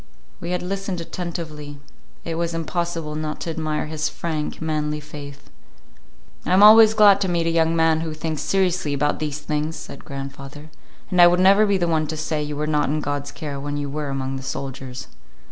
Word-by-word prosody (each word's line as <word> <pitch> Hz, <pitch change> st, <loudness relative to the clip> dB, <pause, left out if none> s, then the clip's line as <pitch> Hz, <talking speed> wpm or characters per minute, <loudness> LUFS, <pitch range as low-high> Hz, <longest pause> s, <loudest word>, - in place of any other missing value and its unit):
We 170 Hz, -, -6 dB
had 180 Hz, 0 st, -1 dB
listened 195 Hz, -1 st, -3 dB
attentively. 160 Hz, -4 st, -6 dB, 0.5 s
It 165 Hz, -, -3 dB
was 170 Hz, 0 st, -2 dB
impossible 165 Hz, -1 st, -3 dB
not 155 Hz, 0 st, -4 dB
to 165 Hz, -, -3 dB
admire 155 Hz, -1 st, -2 dB
his 155 Hz, 0 st, -2 dB
frank, 155 Hz, -2 st, -4 dB
manly 150 Hz, -1 st, -2 dB
faith. 145 Hz, -1 st, -11 dB, 0.9 s
"I -, -, 0 dB
am 190 Hz, +2 st, +6 dB
always 220 Hz, +1 st, +9 dB
glad 205 Hz, -2 st, +6 dB
to 195 Hz, -, +1 dB
meet 170 Hz, -1 st, 0 dB
a 165 Hz, -, +1 dB
young 165 Hz, 0 st, +2 dB
man 160 Hz, -1 st, +3 dB
who 160 Hz, -1 st, -4 dB
thinks 155 Hz, -1 st, -3 dB
seriously 180 Hz, -6 st, 0 dB
about 145 Hz, +1 st, 0 dB
these 150 Hz, -2 st, -3 dB
things," 150 Hz, +1 st, -2 dB
said 140 Hz, -, -9 dB
grandfather, 140 Hz, +2 st, -8 dB, 0.4 s
"and 180 Hz, -1 st, +5 dB
I 175 Hz, -, +10 dB
would 175 Hz, +1 st, +3 dB
never 200 Hz, +3 st, +6 dB
be 200 Hz, -1 st, +2 dB
the 175 Hz, -2 st, 0 dB
one 160 Hz, -2 st, +1 dB
to 155 Hz, +1 st, -4 dB
say 155 Hz, 0 st, -2 dB
you 150 Hz, 0 st, -4 dB
were 150 Hz, -, -1 dB
not 150 Hz, -2 st, +1 dB
in 155 Hz, +2 st, 0 dB
God's 145 Hz, -1 st, -3 dB
care 145 Hz, -4 st, -6 dB
when 145 Hz, +1 st, -4 dB
you 145 Hz, -1 st, -4 dB
were 150 Hz, 0 st, -3 dB
among 135 Hz, 0 st, -3 dB
the -, -, -7 dB
soldiers." 135 Hz, -1 st, -6 dB
155 Hz, 200 wpm, -22 LUFS, 145-170 Hz, 0.9 s, I